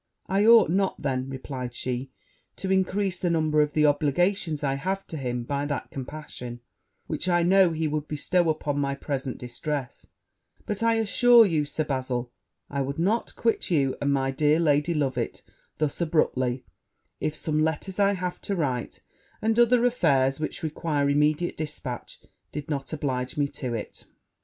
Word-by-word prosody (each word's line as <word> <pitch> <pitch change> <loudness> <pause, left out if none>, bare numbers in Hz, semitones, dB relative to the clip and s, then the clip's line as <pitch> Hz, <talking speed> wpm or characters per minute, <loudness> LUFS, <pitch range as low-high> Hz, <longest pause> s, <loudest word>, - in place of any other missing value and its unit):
'I 200 +3 +2
ought 230 -5 +8
not, 195 +1 +1
then,' 130 -1 -1
replied 130 -2 -6
she, 125 +1 -3 0.5
'to 190 - -3
increase 190 0 +1
the 180 - 0
number 155 -2 +2
of 150 0 -1
obligations 150 +3 +2
I 135 -1 +1
have 190 +8 -2
to - - -7
him 125 -4 -3
by 140 +3 -2
that 145 -2 -4
compassion 125 -3 -7 0.4
which 185 - -2
I 175 -1 +3
know 190 +1 +5
he 160 -1 -1
would 150 0 -2
bestow 170 +3 +1
on 150 -2 -1
my 140 -1 0
present 135 -2 -4
distress: 130 +2 -5 0.6
but 210 0 -3
I 230 0 +3
assure 230 +2 +6
you, 160 -6 +1
Sir 155 +2 -2
Bazil, 130 -3 -2 0.4
I 140 -1 -2
would 140 +1 -3
not 200 +8 0
quit 230 -1 0
you 140 -6 +2
and 140 0 +1
my 135 -1 +1
dear 150 +3 +3
Lady 150 +1 +2
Loveit 130 -5 -2 0.3
thus 155 +2 -1
abruptly, 130 -6 +1 0.5
if 155 - -2
some 155 -1 -1
letters 160 +5 -1
I 200 0 +4
have 180 -2 -4
to 200 - -2
write, 130 -8 -2 0.4
and 225 +1 +1
other 240 0 +5
affairs 140 - +2
which 155 +2 -3
require 150 -2 0
immediate 150 +4 +1
dispatch, 150 -5 -5 0.3
did 150 +1 -5
not 140 -2 -3
oblige 130 -4 -2
me 145 -1 +2
to 125 -4 -4
it.' 110 - -7
150 Hz, 165 wpm, -26 LUFS, 135-175 Hz, 0.6 s, ought